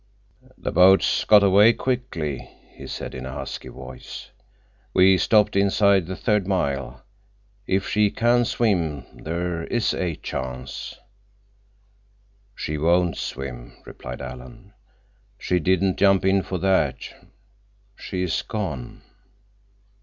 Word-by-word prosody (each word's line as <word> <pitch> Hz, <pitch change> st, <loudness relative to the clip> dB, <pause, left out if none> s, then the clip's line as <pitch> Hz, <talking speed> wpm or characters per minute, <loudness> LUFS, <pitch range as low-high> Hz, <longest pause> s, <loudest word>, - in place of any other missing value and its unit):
"The -, -, -4 dB
boats 95 Hz, +3 st, +4 dB
got 105 Hz, -1 st, +7 dB
away 100 Hz, +4 st, +6 dB
quickly," 115 Hz, -, -3 dB, 0.2 s
he -, -, -10 dB
said -, -, -6 dB
in 65 Hz, -, -7 dB
a 65 Hz, -, -7 dB
husky -, -, -6 dB
voice. 65 Hz, -1 st, -10 dB, 0.6 s
"We 95 Hz, +1 st, +6 dB
stopped 105 Hz, -3 st, +3 dB
inside 100 Hz, -2 st, +3 dB
the 95 Hz, -, -4 dB
third 105 Hz, -2 st, 0 dB
mile. 70 Hz, -9 st, -2 dB, 0.6 s
If 95 Hz, +1 st, 0 dB
she 105 Hz, -1 st, +2 dB
can 120 Hz, +3 st, +2 dB
swim—there 85 Hz, -, -2 dB
is 120 Hz, -2 st, 0 dB
a 90 Hz, -4 st, -2 dB
chance." 65 Hz, -1 st, -6 dB, 1.6 s
"She 75 Hz, 0 st, -4 dB
won't 85 Hz, +2 st, +2 dB
swim," -, -, -6 dB
replied -, -, -8 dB
Alan. 65 Hz, 0 st, -10 dB, 0.6 s
"She 90 Hz, -, 0 dB
didn't 95 Hz, +3 st, +1 dB
jump 95 Hz, -1 st, +4 dB
in 95 Hz, 0 st, +3 dB
for 95 Hz, -, -4 dB
that. 95 Hz, -6 st, +1 dB, 1.0 s
She 90 Hz, -, -4 dB
is 90 Hz, -, -1 dB
gone." 85 Hz, -, -5 dB
90 Hz, 115 wpm, -23 LUFS, 70-100 Hz, 1.6 s, got